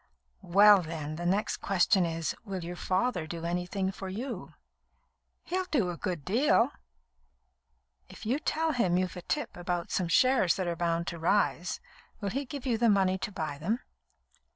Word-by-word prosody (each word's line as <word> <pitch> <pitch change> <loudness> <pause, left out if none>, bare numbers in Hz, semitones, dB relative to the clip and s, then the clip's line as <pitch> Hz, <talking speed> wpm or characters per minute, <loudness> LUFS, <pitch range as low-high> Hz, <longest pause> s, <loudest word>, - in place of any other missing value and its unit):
"Well, 200 +2 +7
then, 155 -2 -5
the 175 0 -2
next 200 +4 +1
question 190 -1 +3
is: 165 -1 -2
Will 195 -5 -5
your 175 +1 -5
father 185 -1 0
do 165 0 -5
anything 180 +3 -1
for 195 0 -7
you?" 235 +8 -6 0.9
"He'll 370 +1 -2
do 230 - +1
a - - -5
good 165 -1 -3
deal." 245 +4 +3 1.4
"If - - -11
you 250 +7 +1
tell 320 +1 0
him 185 - +2
you've 185 -1 -1
a 180 - -6
tip 295 - -3
about 175 -1 -3
some 185 - 0
shares 250 +1 +4
that 190 - -2
are 170 -1 -1
bound 170 0 0
to 170 - -7
rise, 175 0 +1 0.4
will 200 -3 -2
he 275 +2 -2
give 280 0 -7
you 235 -4 +1
the 235 -1 +4
money 190 -2 +3
to 205 - -4
buy 155 -6 -4
them?" 215 +10 -1
185 Hz, 175 wpm, -29 LUFS, 170-225 Hz, 1.4 s, Well